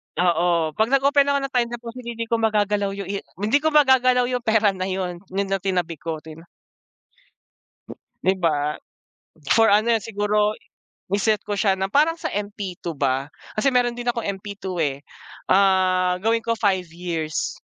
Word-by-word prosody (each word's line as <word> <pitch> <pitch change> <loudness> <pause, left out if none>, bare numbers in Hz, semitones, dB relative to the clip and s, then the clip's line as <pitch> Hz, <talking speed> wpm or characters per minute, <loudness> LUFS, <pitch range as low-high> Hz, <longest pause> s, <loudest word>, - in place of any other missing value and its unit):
Oo. 170 -2 +2
Pag 220 +7 +1
nag-open 280 +1 +3
ako 280 0 +2
ng 275 0 -5
time 240 -1 +2
deposit 240 +1 -9
hindi 230 -1 -4
ko 230 0 0
magagalaw 210 -2 +1
yung 200 -1 -6
i 200 - -2 0.2
hindi 230 +8 +3
ko 315 - 0
magagalaw 260 -4 +4
yung 250 0 -1
pera 220 -2 +3
na 185 0 -3
yun. 185 -2 -3 0.2
Yun 200 0 -1
lang 195 -2 0
tinabi 180 -5 -1
ko 165 -1 -4
tin 160 +2 -12 1.8
Di 190 - +4
ba? 150 -4 0 0.8
For 225 0 +5
ano 215 +3 +4
yun 225 - 0
siguro 210 0 0 0.6
i-set 205 +1 +1
ko 205 -1 -4
siya 195 -2 +3
na 190 0 -3
parang 305 +7 +3
sa - - -3
MP2 200 -4 -5
ba? 135 -1 0 0.3
Kasi 270 +4 +2
meron 245 -1 +1
din 240 - -6
akong 235 -1 0 0.2
MP2 195 -2 -6
eh, 140 -3 -1 0.5
ah, 185 -2 +3
gawin 225 +1 +2
ko 230 - +1
5 195 -5 0
years, 165 -3 -3
205 Hz, 165 wpm, -23 LUFS, 180-230 Hz, 1.8 s, For